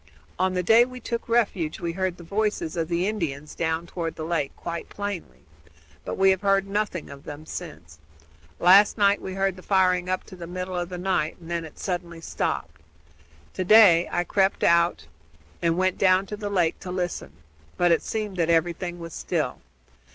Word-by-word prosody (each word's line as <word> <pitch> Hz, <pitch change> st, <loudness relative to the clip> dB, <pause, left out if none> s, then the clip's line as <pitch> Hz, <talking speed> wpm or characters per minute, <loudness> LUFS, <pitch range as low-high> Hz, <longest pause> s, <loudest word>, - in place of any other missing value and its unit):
On 185 Hz, 0 st, +1 dB
the 180 Hz, -, 0 dB
day 225 Hz, +6 st, +6 dB
we 255 Hz, 0 st, -7 dB
took 235 Hz, 0 st, -4 dB
refuge 200 Hz, -9 st, +1 dB
we 170 Hz, -, -2 dB
heard 185 Hz, 0 st, -2 dB
the 175 Hz, -, -11 dB
voices 200 Hz, -2 st, -1 dB
of 165 Hz, -2 st, -1 dB
the 175 Hz, +2 st, 0 dB
Indians 155 Hz, -9 st, -3 dB
down 160 Hz, 0 st, -1 dB
toward 170 Hz, -1 st, -4 dB
the 160 Hz, -, -6 dB
lake 160 Hz, -4 st, -1 dB
quite 170 Hz, 0 st, -6 dB
plainly, 205 Hz, -3 st, -6 dB, 0.6 s
but -, -, -5 dB
we 195 Hz, 0 st, +5 dB
have 190 Hz, -, 0 dB
heard 195 Hz, -1 st, +2 dB
nothing 200 Hz, -6 st, -2 dB
of 140 Hz, 0 st, -11 dB
them 150 Hz, +1 st, -9 dB
since. 80 Hz, -, -9 dB, 0.6 s
Last 195 Hz, +5 st, +6 dB
night 200 Hz, -1 st, +3 dB
we 190 Hz, -, -6 dB
heard 195 Hz, -1 st, 0 dB
the -, -, -10 dB
firing 185 Hz, -2 st, +2 dB
up 185 Hz, -, -1 dB
to 185 Hz, -, -12 dB
the 170 Hz, -2 st, -8 dB
middle 180 Hz, +1 st, -5 dB
of 175 Hz, 0 st, -2 dB
the 180 Hz, -, -5 dB
night, 175 Hz, -4 st, -1 dB
and 170 Hz, 0 st, -10 dB
then 170 Hz, -1 st, -2 dB
it 155 Hz, -, -13 dB
suddenly 175 Hz, -3 st, -4 dB
stopped. 80 Hz, -, -3 dB, 0.7 s
To 185 Hz, -, -2 dB
day 185 Hz, -4 st, +7 dB
I 175 Hz, -, +1 dB
crept 195 Hz, +2 st, +1 dB
out 170 Hz, 0 st, +3 dB, 0.6 s
and 165 Hz, 0 st, +1 dB
went 185 Hz, 0 st, +1 dB
down 185 Hz, 0 st, +4 dB
to 210 Hz, -, -6 dB
the 205 Hz, -1 st, -5 dB
lake 175 Hz, -5 st, +1 dB
to 185 Hz, -, -8 dB
listen; 175 Hz, -, -3 dB, 0.4 s
but 175 Hz, -1 st, +3 dB
it 165 Hz, -, +3 dB
seemed 210 Hz, -4 st, -4 dB
that 170 Hz, -1 st, +1 dB
everything 175 Hz, +1 st, 0 dB
was 165 Hz, -2 st, -8 dB
still. -, -, -2 dB
180 Hz, 195 wpm, -25 LUFS, 170-195 Hz, 0.7 s, day